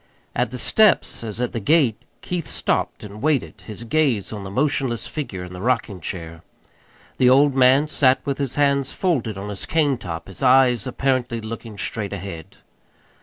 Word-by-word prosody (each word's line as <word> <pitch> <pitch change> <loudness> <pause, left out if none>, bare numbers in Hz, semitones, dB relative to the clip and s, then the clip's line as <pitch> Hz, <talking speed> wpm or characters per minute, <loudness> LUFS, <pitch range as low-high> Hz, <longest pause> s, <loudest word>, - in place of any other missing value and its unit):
At 125 -1 +1
the 125 - -6
steps, 210 - +3
as 110 -1 -5
at 125 -1 -2
the 115 - -2
gate, 130 -1 +2 0.2
Keith 175 -4 -3
stopped - - -1
and 105 0 -9
waited, 150 -2 0
his 110 +1 -8
gaze 120 -5 0
on 105 -2 -6
the 95 - -6
motionless 130 0 -1
figure 120 - -5
in 90 0 -9
the 90 - -8
rocking 110 -6 -1
chair. 85 0 -6 0.8
The 125 - +6
old 140 +2 +5
man 130 +3 +5
sat 135 -3 +3
with 140 -1 -2 0.2
hands 140 -2 +2
folded 130 - -1
on 100 +1 -6
his 100 -2 -5
cane 145 -6 +1
top, 85 -6 -6
his 95 - -10
eyes 125 -2 +4
apparently 130 -2 -1
looking 110 -1 -7
straight 105 -1 -3
ahead. 95 -5 -8
120 Hz, 170 wpm, -22 LUFS, 105-140 Hz, 0.8 s, The